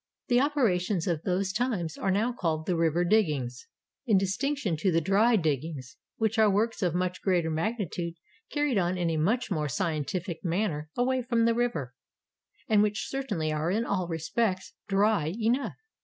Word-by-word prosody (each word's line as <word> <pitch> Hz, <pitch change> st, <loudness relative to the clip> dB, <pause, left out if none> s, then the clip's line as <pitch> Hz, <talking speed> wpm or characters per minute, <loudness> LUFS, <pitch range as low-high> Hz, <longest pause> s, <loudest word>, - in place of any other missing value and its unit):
The 245 Hz, 0 st, +5 dB
operations 210 Hz, -, +1 dB
of 170 Hz, -4 st, -1 dB
those 190 Hz, +1 st, -1 dB
times 215 Hz, -9 st, -1 dB
are -, -, -2 dB
now 215 Hz, +6 st, +1 dB
called 160 Hz, -8 st, -2 dB
the 180 Hz, -, 0 dB
"river 165 Hz, +1 st, +2 dB
diggings" 150 Hz, -, +1 dB, 0.4 s
in 215 Hz, -4 st, +5 dB
distinction 195 Hz, -, 0 dB
to 185 Hz, +5 st, +1 dB
the 165 Hz, -, +3 dB
"dry 205 Hz, +8 st, +3 dB
diggings," 150 Hz, -, -2 dB, 0.2 s
which 220 Hz, 0 st, 0 dB
are 215 Hz, -1 st, +6 dB
works 220 Hz, +4 st, 0 dB
of 175 Hz, -3 st, +1 dB
much 180 Hz, 0 st, -1 dB
greater 175 Hz, -4 st, +1 dB
magnitude, 170 Hz, -1 st, -2 dB, 0.4 s
carried 290 Hz, -7 st, +1 dB
on 180 Hz, 0 st, 0 dB
in 175 Hz, -2 st, 0 dB
a 160 Hz, -, -1 dB
much 215 Hz, +9 st, 0 dB
more 150 Hz, -5 st, 0 dB
scientific 165 Hz, +4 st, -2 dB
manner 170 Hz, -4 st, -1 dB
away 255 Hz, +1 st, +1 dB
from 235 Hz, -2 st, +1 dB
the 230 Hz, -, +4 dB
river, 225 Hz, -, -1 dB, 0.4 s
— -, -, -38 dB
and 215 Hz, -2 st, +4 dB
which 210 Hz, -1 st, 0 dB
certainly 210 Hz, -13 st, -2 dB
are 155 Hz, +2 st, -1 dB
in 220 Hz, +5 st, 0 dB
all 185 Hz, -5 st, -1 dB
respects 185 Hz, +4 st, -1 dB
"dry" 195 Hz, -4 st, +2 dB
enough. 235 Hz, +4 st, 0 dB
190 Hz, 170 wpm, -28 LUFS, 165-225 Hz, 0.4 s, are